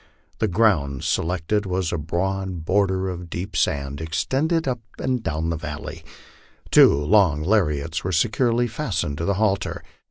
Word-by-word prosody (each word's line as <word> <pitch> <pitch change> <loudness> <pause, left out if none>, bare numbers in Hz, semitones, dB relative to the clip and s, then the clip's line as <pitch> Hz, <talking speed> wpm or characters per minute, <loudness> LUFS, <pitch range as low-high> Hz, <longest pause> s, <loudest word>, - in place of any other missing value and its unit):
Tho 110 - +2
ground 85 -10 +2
selected 95 +5 0
was 90 -2 -1
a - - 0
broad 90 +2 -2
border 95 0 +1
of 90 -2 -6
deep 90 +4 -5
sand, 70 +1 -1
extending 135 - 0
up 125 -2 -1 0.2
and 130 -2 -1
down 80 -2 -2
the 85 - -2
vallo}'. 75 -2 -6 0.7
Two - - +8
long 75 +1 +3
lariats 80 -5 0
were 95 - -2
securely 115 +6 +2
fastened 110 - -3
to 85 - -1
the 100 - +1
halter. 100 -1 0
90 Hz, 150 wpm, -23 LUFS, 80-105 Hz, 0.7 s, Two